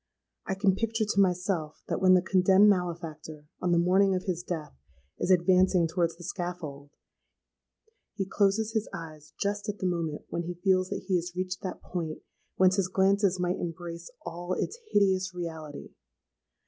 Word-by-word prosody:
I 195 - -1
can 195 0 +3
picture 225 +2 -1
to 200 -1 +3
myself 180 -4 0
that - - -2
when 185 -1 +7
the 180 - +3
condemned 190 +2 +5
malefactor, 165 -5 -2 0.2
on 180 - +1
the 170 - +4
morning 190 +3 +4
of 185 - -2
his 175 -2 -2
death, 165 -4 -5 0.5
is - - -1
advancing 185 -1 +4
towards 170 0 0
the 175 - -11
scaffold, 165 -6 -5 1.3
he 195 - -1
closes 200 +3 +1
his 220 -1 -1
eyes 155 -3 -9
just 205 +1 -1
at 205 - -3
the 185 - -4
moment 165 -4 -2
when 170 - -2
he 175 +1 -4
feels 185 -2 +3
that - - -4
he 185 -2 +3
has 175 +1 -5
reached 185 0 -3
that 190 -3 -6
point 165 -3 -5 0.3
whence 185 +1 +4
his 195 -2 +2
glances 195 0 +2
might 180 0 0
embrace 170 0 -6 0.2
all 175 +1 -4
its 465 - -3
hideous 190 -2 +2
reality. 160 -4 -6
180 Hz, 170 wpm, -28 LUFS, 170-195 Hz, 1.3 s, when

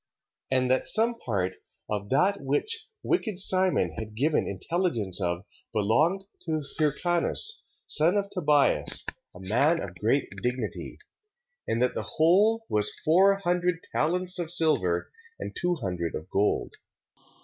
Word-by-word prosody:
And 130 -1 +1
that 130 - +1
some 230 +2 +3
part 95 -5 -3 0.3
of 100 -1 -4
that 195 +9 +1
which 435 - -2 0.2
wicked 225 - -1
Simon 190 -1 +3
had 110 -1 -8
given 145 +6 +1
intelligence 105 - -1
of 85 0 -2 0.3
belonged 150 - +1 0.2
to 155 -2 -2 0.2
Hircanus, 175 - +2 0.2
son 165 +6 +3
of 200 -1 0
Tobias, 150 -5 +2 0.3
a - - -11
man 125 - +1
of 90 - -6
great 110 +10 0
dignity; 125 +1 -4 0.7
and 115 +2 0
that 125 - +1
the - - -5
whole 205 +8 +3
was 105 -1 +1
four 190 +5 +4
hundred 180 -2 -1
talents 180 +3 +1
of 170 -2 -2
silver, 150 - +2 0.3
and - - -7
two 175 0 -1
hundred 90 - -4
of 80 - -7
gold. 105 +1 0
155 Hz, 135 wpm, -26 LUFS, -, 0.7 s, four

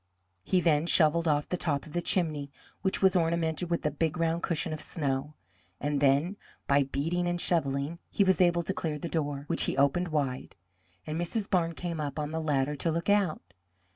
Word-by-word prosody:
He 180 - +2
then 160 -1 +2
shovelled 165 0 +3
off 150 -1 +1
the 180 - -2
top 145 -5 -1
of 155 - -12
the 175 - 0
chimney, 155 -6 0 0.3
which 190 0 0
was 190 -1 +5
ornamented 165 0 0
with 170 -2 -1
a 150 - +2
big 160 +3 -1
round 165 0 0
cushion 165 -1 -1
of 155 - -5
snow, 145 -1 -2 0.4
and 145 0 -1
then 145 +8 +3 0.3
by 140 0 +3
beating 165 +6 -1
and 175 0 -1
shovelling 150 -1 0
he 200 - +2
was 190 -1 +3
able 175 -1 +3
to 190 - -2
clear 155 -5 -3
the 160 - -5
door, 145 -4 -2
which - - 0
he - - -2
opened 140 +6 +2
wide, 140 -5 -2 0.5
and 155 +2 -3
Mrs. 200 +4 -1
Barnes 170 -4 +1
came 170 -3 -3
up 145 -1 -4
on 150 0 -2
the 160 0 -2
ladder 145 -2 0
to 165 - -1
look 170 +4 0
out. 200 - +1
160 Hz, 200 wpm, -29 LUFS, 145-175 Hz, 0.5 s, was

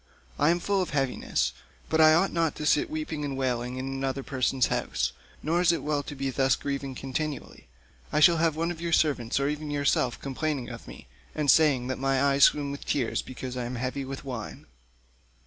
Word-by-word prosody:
I 145 - +4
am 175 +1 +2
full 200 +2 0
of 180 - -2
heaviness, 135 -4 0 0.3
but 160 0 +2
I 155 0 +7
ought 190 +4 +2
not 165 -2 +1
to 150 - -5
sit 340 - +3
weeping 305 - -4
and 140 -2 -3
wailing 125 -1 -1
in 130 - -4
another 135 0 -3
person's 130 -1 +1
house, 60 +1 -1 0.3
nor 165 +4 +1
is 180 - +5
it 170 - -2
well 150 -1 0
to 145 - -8
be 135 0 -2
thus 135 0 +2
grieving 140 -2 -4
continually. 135 +2 -5 0.4
I - - +2
shall 165 +2 +6
have 160 -1 +2
one 165 +2 -1
of 170 - -7
the 170 0 -3
servants 140 -7 +2
or 140 - +1
even 150 +1 -3
yourself 145 -4 +1
complaining 140 -1 -3
of - - -9
me, - - -11 0.3
and 150 -2 +4
saying 145 -6 +4
that 130 - -3
my 135 0 +1
eyes 140 0 +5
swim 145 -1 +1
with 140 - -7
tears 130 -5 0
because 130 0 -7
I 125 -1 -3
am 125 +1 -4
heavy 130 +3 -3
with 135 +1 -7
wine." 125 -5 -6
140 Hz, 210 wpm, -27 LUFS, 130-155 Hz, 0.4 s, I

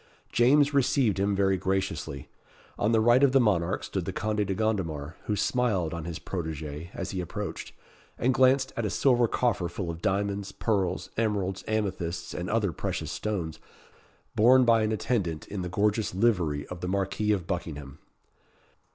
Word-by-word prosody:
James 140 +4 +4
received 130 -7 +2
him 100 +1 +1
very 95 -1 +2
graciously. 95 -7 -2 0.5
On 105 - +2
the 115 - +4
right 120 +3 +5
of 140 -2 +4
the 135 - +6
monarch 95 -8 +1
stood - - -3
the - - -2
Conde 105 -1 -1
de 95 - -1
Gondomar, 85 -8 -2
who 105 - 0
smiled 100 -6 0
on 85 -2 -5
his 85 -2 -4
protégé 80 -3 -5
as - - -4
he 95 - -2
approached, 85 - -5 0.5
and 130 +2 +2
glanced 130 +1 +3
at 115 - -2
a 105 - 0
silver 120 +4 +3
coffer 115 -7 0
full 85 -1 -4
of 85 0 -9
diamonds, 100 0 -1
pearls, 95 -4 -1
emeralds, 100 -4 -1
amethysts, 95 -6 -2
and 90 +1 -4
other 105 -4 +1
precious - - -4
stones, 90 -7 -3 0.7
borne 125 +4 +6
by 115 -1 +5
an 110 0 +1
attendant 105 -8 -1
in 100 -2 -4
the 90 - -4
gorgeous 105 +2 0
livery 90 -9 +1
of 90 -1 -8
the 90 - -3
Marquis 100 +2 0
of 95 -5 0
Buckingham. 75 -6 -5
100 Hz, 170 wpm, -28 LUFS, 85-110 Hz, 0.7 s, the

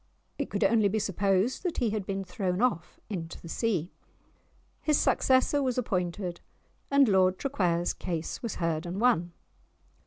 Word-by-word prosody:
It - - -2
could - - -1
only 220 -3 +4
be 205 +2 0
supposed 195 +3 +1
that 360 -3 -3
he 235 -4 +1
had 210 -3 -3
been 195 0 -2
thrown 180 0 -2
off 195 -9 0
into 170 -6 -5
the - - -11
sea. 185 -2 -1 0.9
His 300 -2 +2
successor 260 +2 +3
was 255 -2 0
appointed, 180 -5 -2 0.5
and 280 -1 +5
Lord 190 -2 +3
Traquair's 180 -11 0
case 170 -3 -4
was 230 -4 -4
heard 165 0 -1
and 180 +3 -4
won! 175 -8 +2
195 Hz, 155 wpm, -29 LUFS, 175-235 Hz, 0.9 s, and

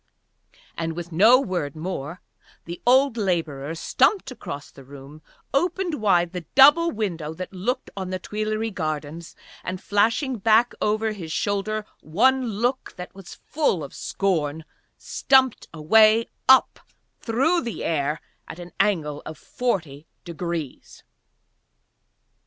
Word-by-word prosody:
And 165 -1 -3
with 175 0 -7
no 220 +10 +6
word 175 - -3
more 165 0 -5 0.4
the 170 +1 -8
old 260 0 +4
labourer 165 -7 -2
stumped 360 - +1
across 145 - -8
the 135 - -14
room, 140 +3 -13 0.3
opened 345 - 0
wide 175 -5 +2
the 180 - -4
double 295 +5 +7
window 170 - -4
that 185 +3 -7
looked 205 +8 -3
on 190 -2 -5
the 185 - -2
Tuileries 215 +3 -3
gardens 155 -1 -5 0.3
and, 185 +1 -4
flashing 225 +6 +1
back 225 +3 +3
over 215 +1 0
his 175 -7 -7
shoulder 205 +4 -2
one 255 +10 +2
look 240 +5 -2
that 180 +1 -8
was 195 -2 -11
full 280 - 0
of 140 - -9
scorn, 160 -5 -2 0.3
stumped 265 -2 +2
away 215 +8 +4 0.2
up 265 0 +5 0.4
through 270 +10 +1
the 235 -3 -5
air 150 -1 -1 0.3
at - - -9
an 175 0 -10
angle 150 -8 0
of 155 - -8
forty 160 - -3 0.2
degrees. 170 -4 -6
190 Hz, 130 wpm, -24 LUFS, 160-230 Hz, 0.4 s, double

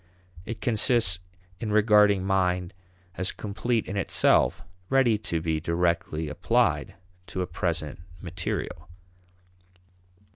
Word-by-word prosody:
It 115 -2 -6
consists 110 -5 +3 0.4
in 110 0 -3
regarding 105 -2 +4
mind 90 -2 0 0.4
as 95 0 0
complete 110 +3 -2
in - - -5
itself, 100 - +3 0.3
ready 130 -5 +3
to 85 -6 -2
be 80 -2 0
directly 85 -1 -1
applied 75 - 0 0.3
to 95 - -3
a - - -2
present 80 -4 -3 0.2
material. 85 -1 -5
95 Hz, 105 wpm, -26 LUFS, 85-105 Hz, 0.4 s, regarding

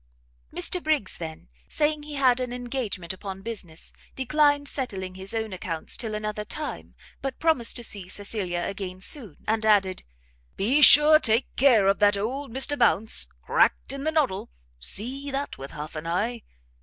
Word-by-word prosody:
Mr 355 - +1
Briggs 305 - 0
then, 160 - -8 0.2
saying 300 0 0
he 295 0 -8
had 255 -3 +3
an 250 -1 -3
engagement 240 -8 -4
upon 190 0 -8
business, 190 -8 -7 0.2
declined 290 +2 +2
settling 195 -10 -4
his 190 +1 -7
own 220 -2 -3
accounts 170 -3 -4
till 220 -2 -3
another 210 0 -4
time, 300 +7 -7 0.3
but 270 -1 -4
promised 315 -8 +2
to 240 - -4
see 200 -5 -3
Cecilia 190 -3 -2
again 190 -2 -5
soon, 205 - -5
and 220 0 0
added, 200 -3 +2 0.6
"be 260 +9 +2
sure 300 +1 +9
take 230 -3 +1
care 240 -7 +5
of 195 0 +2
that 205 -1 +4
old 255 +6 -4
Mr 265 +4 +4
Bounce! 225 -4 +2 0.2
cracked - - +2
in 275 0 -6
the 315 - 0
noddle; 290 -12 0 0.3
see 255 - -1
that 275 +1 -4
with 135 +1 -7
half 150 +2 -8
an 155 +2 -6
eye! 220 +8 -1
225 Hz, 165 wpm, -25 LUFS, 190-275 Hz, 0.6 s, sure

